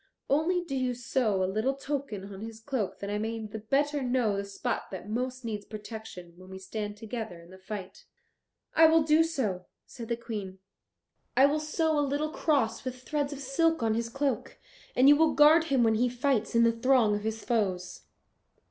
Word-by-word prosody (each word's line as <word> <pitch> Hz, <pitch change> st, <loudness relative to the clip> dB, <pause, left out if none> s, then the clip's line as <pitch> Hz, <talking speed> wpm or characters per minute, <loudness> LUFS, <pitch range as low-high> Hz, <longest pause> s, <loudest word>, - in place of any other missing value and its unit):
Only 340 Hz, +5 st, +2 dB
do 320 Hz, -6 st, -7 dB
you 255 Hz, -2 st, 0 dB
sew 235 Hz, -5 st, 0 dB
a -, -, +2 dB
little 215 Hz, +8 st, 0 dB
token 265 Hz, -9 st, -4 dB
on 190 Hz, -, -9 dB
his 225 Hz, 0 st, -7 dB
cloak, 225 Hz, -4 st, -3 dB
that 200 Hz, 0 st, -4 dB
I 210 Hz, -, -1 dB
may 225 Hz, +1 st, -2 dB
the 215 Hz, +1 st, -6 dB
better 285 Hz, +6 st, 0 dB
know 245 Hz, -5 st, +1 dB
the 200 Hz, -, -2 dB
spot 200 Hz, +5 st, -3 dB
that 190 Hz, +1 st, -7 dB
most 250 Hz, +3 st, -3 dB
needs 210 Hz, -3 st, -3 dB
protection 210 Hz, -5 st, -9 dB
when 185 Hz, +1 st, -14 dB
we 190 Hz, -, -8 dB
stand 205 Hz, +2 st, -5 dB
together 220 Hz, -4 st, -6 dB
in 170 Hz, +1 st, -15 dB
the 190 Hz, -, -13 dB
fight." 195 Hz, -1 st, -8 dB, 0.7 s
"I 320 Hz, -, +8 dB
will 320 Hz, 0 st, +5 dB
do 310 Hz, +1 st, +5 dB
so," 220 Hz, -, -2 dB, 0.2 s
said 230 Hz, -2 st, -9 dB
the 235 Hz, 0 st, -1 dB
Queen; 210 Hz, -5 st, -6 dB, 0.8 s
"I 265 Hz, -, +8 dB
will 295 Hz, +2 st, +2 dB
sew 310 Hz, 0 st, 0 dB
a -, -, +3 dB
little 290 Hz, +2 st, -1 dB
cross 280 Hz, -10 st, 0 dB
with 255 Hz, -1 st, -6 dB
threads 290 Hz, 0 st, -1 dB
of 285 Hz, -1 st, -6 dB
silk 320 Hz, +2 st, +1 dB
on 220 Hz, -1 st, +2 dB
his 230 Hz, +1 st, -2 dB
cloak, 275 Hz, +3 st, -2 dB, 0.4 s
and 255 Hz, +2 st, +5 dB
you 290 Hz, -, +9 dB
will 315 Hz, +1 st, +3 dB
guard 310 Hz, +2 st, +7 dB
him 270 Hz, -6 st, +2 dB
when 225 Hz, -1 st, +4 dB
he 245 Hz, +3 st, +2 dB
fights 245 Hz, -3 st, 0 dB
in 230 Hz, -, +6 dB
the 230 Hz, -, +5 dB
throng 230 Hz, -2 st, +3 dB
of 205 Hz, -, -3 dB
his 220 Hz, 0 st, -4 dB
foes." 190 Hz, -6 st, -1 dB
235 Hz, 200 wpm, -29 LUFS, 210-280 Hz, 0.8 s, you